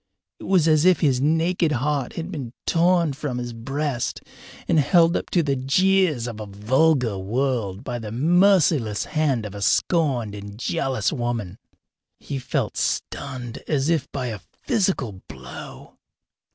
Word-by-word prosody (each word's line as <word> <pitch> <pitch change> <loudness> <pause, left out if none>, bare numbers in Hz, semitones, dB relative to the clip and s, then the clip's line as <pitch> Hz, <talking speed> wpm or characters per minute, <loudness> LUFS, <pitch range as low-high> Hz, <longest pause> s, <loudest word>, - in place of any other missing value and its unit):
It - - -9
was 180 -5 +3
as 155 -1 +4
if 185 0 +4
his 135 -6 +2
naked 165 +2 +2
heart 140 0 -1
had 165 +3 -5
been 135 -9 -6
torn 170 -2 +3
from 135 -2 -4
his 120 -1 -4
breast 135 +2 -3 0.5
and 160 - +3
held 170 +3 +4
up - - -2
to 175 - +2
the 140 -2 0
jeers 155 0 +2
of 115 -3 -6
a 105 - -6
vulgar 120 +2 +1
world 110 -1 -1
by 120 -2 -4
the 110 -2 -7
merciless 155 - +3
hand 145 -7 0
of 100 - -7
a 100 - -7
scorned 130 - +1
and 100 0 -8
jealous 130 -3 -1
woman. 120 - -3 0.6
He 140 -2 -5
felt 130 +1 -2
stunned 125 -4 -3
as 145 -1 +1
if 160 -5 0
by 130 -3 -3
a 110 -3 -5 0.2
physical 185 - 0
blow. - - -11
135 Hz, 150 wpm, -23 LUFS, 115-165 Hz, 0.6 s, as